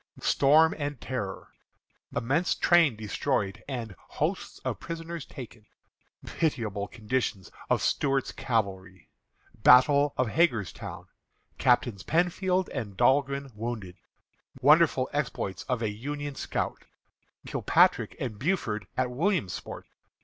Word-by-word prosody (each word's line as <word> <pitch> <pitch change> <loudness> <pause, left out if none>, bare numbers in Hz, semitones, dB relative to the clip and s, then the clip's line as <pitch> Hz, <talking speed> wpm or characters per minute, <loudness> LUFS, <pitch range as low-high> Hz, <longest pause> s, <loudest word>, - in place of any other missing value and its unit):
Storm 155 +4 +4
and 145 -3 -3
Terror. 105 -7 -5 0.7
Immense 140 +9 +1
Train 170 -8 +4
Destroyed, 105 -1 -2
and 120 -7 -5
Hosts - - -3
of - - -2
Prisoners 165 -2 -6
Taken. 120 -5 -10 0.6
Pitiable 110 - -2
Condition 115 -3 -2 0.3
of - - +2
Stuart's 135 -1 +1
Cavalry. 95 -6 -3 0.4
Battle 140 +5 +5
of 130 -3 +1
Hagerstown. 115 - -1 0.5
Captains 120 -5 +2
Penfield 180 - +1
and 105 -8 -5
Dahlgren 140 +2 +2
Wounded. 105 -5 -5 0.6
Wonderful - - +5
Exploits 95 -3 -2
of 125 -2 0
a 110 - 0
Union 145 +6 -5
Scout. - - -3 0.6
Kilpatrick - - +2
and 110 -5 -4
Buford 120 - -1
at 125 -1 0
Williamsport. 155 - -2
125 Hz, 105 wpm, -28 LUFS, 105-145 Hz, 0.7 s, Battle